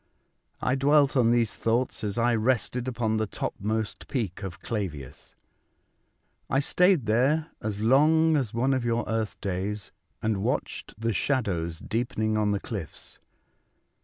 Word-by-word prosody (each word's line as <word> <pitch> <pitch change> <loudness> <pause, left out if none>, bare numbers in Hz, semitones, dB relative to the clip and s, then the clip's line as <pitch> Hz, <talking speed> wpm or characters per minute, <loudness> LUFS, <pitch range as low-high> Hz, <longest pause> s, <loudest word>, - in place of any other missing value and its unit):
I 125 - +1
dwelt 140 +1 +4
on 120 -3 +4
these 120 -2 +2
thoughts 115 +1 -1
as 105 0 -2
I 120 +1 +3
rested 120 +2 0
upon 110 -3 0
the 110 0 0
topmost 110 +2 -3
peak 105 - -3
of 90 -5 -6
Clavius. 85 - -5 1.1
I 135 - +2
stayed 180 - +3
there 135 +9 +2
as 105 -1 -3
long 155 +7 +4
as 130 -8 0
one 125 +4 +1
of 130 -2 0
your 120 0 0
earth 110 -1 -2
days, 100 +1 -3 0.3
and 110 -3 -1
watched 105 - -3
the 115 0 0
shadows 90 - -1
deepening 110 +1 -1
on 105 -1 +2
the 100 -1 +1
cliffs. - - -7
115 Hz, 140 wpm, -27 LUFS, 105-130 Hz, 1.1 s, dwelt